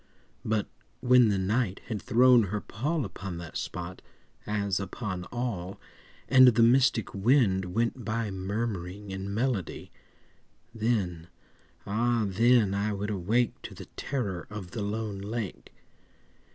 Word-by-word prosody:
But 110 -1 0 0.3
when 125 -1 +6
the 100 - +1
Night 100 +1 0
had 110 -5 -4
thrown 120 0 +5
her 105 +2 -2
pall 140 +8 -2
Upon 95 -2 -6
that 85 -1 -9
spot, 90 0 -5 0.5
as 100 -3 0
upon 95 -1 -4
all, 105 -7 -4 0.5
And 130 -1 +8
the 115 -1 +5
mystic 120 -2 +3
wind 100 -3 +3
went 115 +2 0
by 110 0 -2
Murmuring 100 0 -4
in 95 +1 -5
melody— 110 -4 -2 0.8
Then—ah 110 +2 -2
then 110 +1 +4
I 100 +2 0
would 105 +1 -3
awake 105 +6 0
To - - -9
the - - -9
terror 100 -11 -3
of 105 -4 -7
the 115 - -4
lone 105 -1 -3
lake. 105 -1 -5
105 Hz, 125 wpm, -28 LUFS, 95-120 Hz, 0.8 s, And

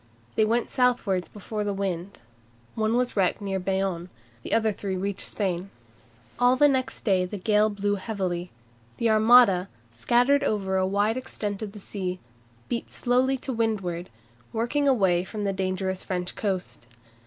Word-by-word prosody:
They 220 - +3
went 230 +2 +1
southwards 235 -8 +1
before 210 +1 -5
the 205 -1 -2
wind. 195 -1 -4 0.5
One 220 +1 0
was 250 0 0
wrecked 190 -3 +2
near 195 -2 -2
Bayonne. 190 -2 -1 0.3
The - - -7
three - - -8
others 220 -3 +1
reached 195 0 -2
Spain. 190 -2 -2 0.7
All 245 +1 +4
next 265 -2 +2
day 190 -5 +2
the 205 +3 -5
gale 210 +2 +3
blew 205 0 -1
heavily. 185 -4 -3 0.5
The 230 -1 +2
Armada, 215 -4 +6 0.2
scattered 245 - +3
over 195 -6 0
a 185 0 +2
wide 205 +4 +1
extent 210 -5 -4
of 210 -1 -6
sea, 185 -2 -4 0.5
beat 235 - -3
slowly 255 +2 +1
to 265 - -2
windward, 195 -7 -1 0.4
working 240 +6 0
away 190 -9 +3
from 210 +2 -5
the 200 -1 0
dangerous 190 0 -2
French 180 -1 -3
coast. 180 - -3
205 Hz, 150 wpm, -26 LUFS, 185-230 Hz, 0.7 s, Armada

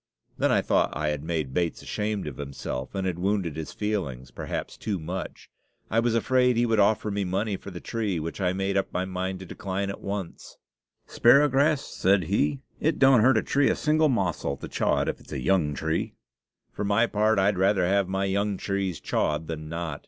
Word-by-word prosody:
Then - - +1
I - - +3
thought - - +1
I 75 0 0
had 75 -1 -3
made 80 -5 -2
Bates 85 0 -1
ashamed 105 -1 -2
of 75 -4 -6
himself, 70 0 -5
and 95 -1 -1
had 90 -2 -2
wounded 95 -4 0
his 80 -1 -5
feelings, 75 - -3
perhaps, - - -5
too 105 -3 -3
much. 90 +3 -6 0.4
I 115 - +3
was 115 0 +1
afraid 125 +1 +3
he 120 - +3
would 115 -2 +2
offer 105 +1 +3
me 100 0 -1
money 100 +3 -1
for 100 - -9
the 90 -2 -7
tree, 105 -6 -2
which 85 +5 -5
I 90 -1 +2
made 95 +1 -1
up 95 - -1
my 90 - -1
mind 95 0 -3
to - - -7
decline 100 +2 -3
at - - -9
once. 100 -3 -6 0.5
"Sparrowgrass," 140 +3 +4
said 95 -8 +1
he, 75 -5 0 0.2
"it - - +1
don't 135 -3 +6
hurt 130 +4 +5
a - - +1
tree 140 0 +2
a - - +2
single 155 0 +2
mossel 85 - -1
to - - -7
chaw - - +1
it - - -2
if - - -2
it's - - -12
a - - -2
young 75 +1 +1
tree. 80 +4 -2 0.6
For - - -4
my 105 +3 +3
part, 110 -1 +2
I'd 95 0 +2
rather 95 -1 +3
have 100 +1 +2
my 95 +1 -1
young 100 +1 0
trees 95 -4 -2
chawed 75 +1 -1
than 80 -1 -6
not. 80 -3 -4
95 Hz, 210 wpm, -26 LUFS, 85-105 Hz, 0.6 s, don't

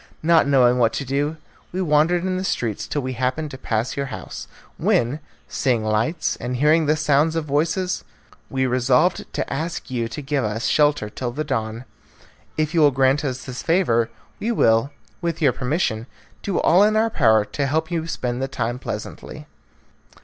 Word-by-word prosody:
Not 165 -2 +4
knowing 125 -3 +4
what 115 -1 +3
to 140 - -3
do, 145 +4 -1 0.3
we 185 - -4
wandered 170 +1 +2
in 185 0 -1
the 185 - -2
streets 115 - -2
till 145 - -2
we 130 0 -3
happened 130 +5 -2
to 130 - -7
pass 110 -1 -2
your 140 0 -2
house, - - -7 0.3
when, 120 +6 +1 0.3
seeing 125 -5 0
lights 110 +10 0
and 125 +1 -4
hearing 150 +4 +3
the 155 - +3
sound 155 +1 +2
of 165 -2 -1
voices, 165 +6 0 0.5
we 130 -1 0
resolved 130 +7 +2
to - - -3
ask 160 0 -4
you 120 -2 -1
to 115 +6 -6
give 140 -1 -1
us 110 +2 -2
shelter 145 -7 +2
till 120 +4 -4
the 150 +6 -3
dawn. 115 -3 -3 0.7
If 155 +1 0
you 170 - +2
will 150 -2 +7
grant 135 +2 +2
us 130 -3 -3
this 130 -1 -6
favour, 120 -10 +2 0.3
we 230 - -1
will, 115 - +3 0.3
with 170 -2 -2
your 140 -5 +3
permission, 125 -4 -1 0.3
do 195 - -2
all 175 +4 +5
in 215 +1 +3
our 220 +1 +2
power 110 - +4
to 140 +5 -2
help 160 +4 -1
you 165 -1 -2
spend 125 -5 -3
the 135 - -1
time 120 -2 -3
pleasantly." - - -7
140 Hz, 185 wpm, -22 LUFS, 125-160 Hz, 0.7 s, will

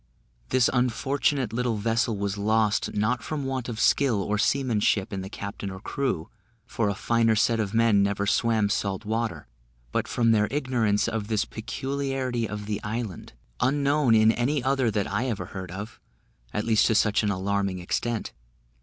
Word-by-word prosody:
This 130 -1 +4
unfortunate 130 0 0
little 120 -1 0
vessel 115 +1 0
was 100 0 -2
lost, 105 0 +1
not 105 +4 +1
from 150 -3 -4
want 130 -2 -3
of 110 -2 -5
skill 130 -7 +3
or 105 0 -1
seamanship 110 -6 +1
in 95 - -3
the 95 - -7
captain 100 0 -6
or 95 0 -7
crew, 120 -7 -2 0.4
for 115 -3 -1
a 100 - -1
finer 115 +1 +2
set 115 +1 +2
of 105 0 -2
men 115 -3 +4
never 100 0 0
swam 110 0 +2
salt 100 -2 -2
water; 110 +1 -2 0.5
but - - -1
from 115 -2 +2
their 105 -2 +3
ignorance 120 -8 +1
of 110 -3 -3
this 110 -1 0
peculiarity 130 0 -3
of 105 0 -5
the 105 0 -3
island, 105 - -5 0.3
unknown 140 -2 +3
in 110 0 +6
any 125 +4 0
other 130 -2 +2
that 105 -2 0
I 105 +6 -1
ever 110 -5 -3
heard 95 -2 -6
of, 100 +5 -7 0.5
at 105 - -2
least 110 -2 +4
to 110 - +2
such 105 -1 +3
an 105 - 0
alarming 100 0 -1
extent. 110 +6 -2
110 Hz, 170 wpm, -26 LUFS, 105-125 Hz, 0.5 s, in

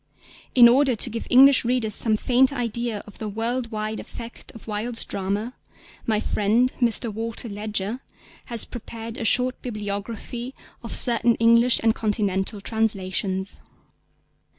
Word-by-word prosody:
In 240 -2 +9
order 260 +1 +4
to 230 - -2
give 230 - -5
English 270 +2 +7
readers 235 -3 0
some 215 0 +2
faint 255 +3 +3
idea 235 -4 -3
of 210 - -15
the 215 - -4
world 230 +3 -2
wide 215 -1 -4
effect 235 0 -10
of 225 - -13
Wilde's 225 +2 -1
drama, 200 +5 -3 0.5
my 215 -2 +2
friend 225 +5 +1
Mr. 230 -1 +1
Walter 225 +2 -4
Ledger 210 +2 -3 0.5
has 235 -3 0
prepared 230 -1 -8
a 225 - -3
short 250 +3 +2
bibliography 220 +3 -5 0.3
of 230 - -4
certain 235 -1 +4
English 235 +2 +4
and 225 -1 +4
Continental 205 -2 -1
translations. 195 -3 -1
225 Hz, 135 wpm, -23 LUFS, 210-240 Hz, 0.5 s, In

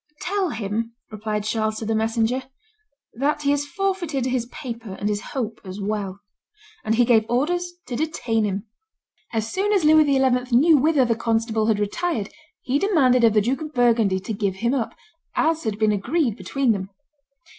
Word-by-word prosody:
"Tell 390 -1 0
him," 225 0 -3 0.2
replied 215 0 -3
Charles 215 0 -1
to 225 - -5
the 225 - 0
messenger, 225 +3 +1 0.7
"that 295 +4 -1
he 280 - +3
has 290 0 0
forfeited 345 -6 -1
his 250 -2 -1
paper 235 -7 -7
and 200 - -3
his 210 0 -1
hope 230 -4 -4
as 190 0 -8
well;" 200 -1 -3 0.6
and 220 +1 +1
he 240 +1 +4
gave 230 -2 +4
orders 350 +8 0
to 245 - -5
detain 235 -7 -1
him. 200 0 -2 0.7
As 225 -1 -2
soon 395 +3 0
as 390 -6 +2
Louis 310 0 +6
XI. 260 -3 +2
knew 310 +4 +6
whither 290 -1 +3
the 235 - +2
constable 225 -1 0
had 220 -2 +3
retired, 215 - -1 0.3
he 265 +3 0
demanded 270 - +3
of 225 -2 +5
the 210 - +4
Duke 250 +7 -1
of 305 -2 -7
Burgundy 230 -6 +3
to 220 - -4
give 200 -2 -1
him 235 +5 0
up, 245 -5 -2 0.4
as 320 -2 +1
had 215 -2 -1
been 215 0 +3
agreed 240 - 0
between 270 +1 0
them. 195 -3 -2
235 Hz, 180 wpm, -23 LUFS, 215-285 Hz, 0.7 s, Louis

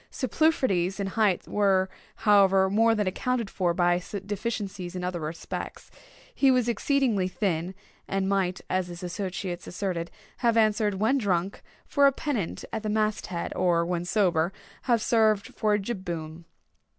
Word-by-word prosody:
Superfluities 235 - +1
in 200 - -1
height 195 -1 +1
were, 195 -2 +2 0.3
however, 195 -2 +4
more 225 +2 +4
than 210 -1 0
accounted 230 +3 -1
for 180 -3 +1
by 175 0 +2 0.2
deficiencies 205 -3 -4
in 180 - -4
other 180 -1 -2
respects. 160 +1 -6 0.4
He 275 - +3
was 250 -2 +3
exceedingly 235 -5 +1
thin; 185 -2 -2 0.3
and 195 0 -1
might, 190 -2 0
as 185 -1 0
his 175 0 -9
associates 180 0 -4
asserted, 175 -2 -3 0.3
have 235 -2 +2
answered, 215 -2 +2
when 220 +8 +2
drunk, 190 -3 -1 0.2
for 285 -1 +4
a - - +5
pennant 255 - -3
at 220 - -2
the 215 - -3
mast 215 0 0
head, 170 -2 -4
or, 170 -2 +2
when 175 0 -2
sober, 175 -3 +1 0.4
have 230 -3 +3
served 215 -3 +2
for 210 -1 +1
a - - 0
jib 195 -1 -4
boom. 165 -1 -6
195 Hz, 155 wpm, -27 LUFS, 180-220 Hz, 0.4 s, a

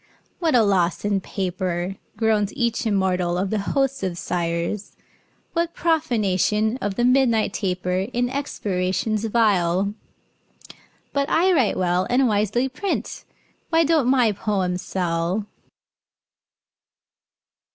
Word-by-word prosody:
"What 325 -6 +2
a 235 - +6
loss 185 -3 +1
in 200 -2 +1
paper," 185 -1 -3 0.2
Groans 215 -3 +1
each 235 -3 0
immortal 185 -4 +1
of 190 +1 -1
the 215 - 0
host 270 +6 0
of 185 -3 -2
sighers! 170 +3 -3 0.6
"What 335 0 -1
profanation 220 - +1
of 205 -6 -3
the 240 - +1
midnight 250 -4 +3
taper 185 -1 -1
In 245 0 0
expirations 210 -6 -2
vile! 200 -4 +2 1.2
But 280 +1 0
I 365 +3 +3
write 260 -10 +2
well, 180 0 +1
And 255 +1 +3
wisely 215 +4 +1
print. 370 +10 -4 0.4
Why 330 0 +4
don't 310 -5 +2
my 250 -4 +4
poems 190 -3 -1
sell?" 175 +2 -1
210 Hz, 115 wpm, -23 LUFS, 185-250 Hz, 1.2 s, a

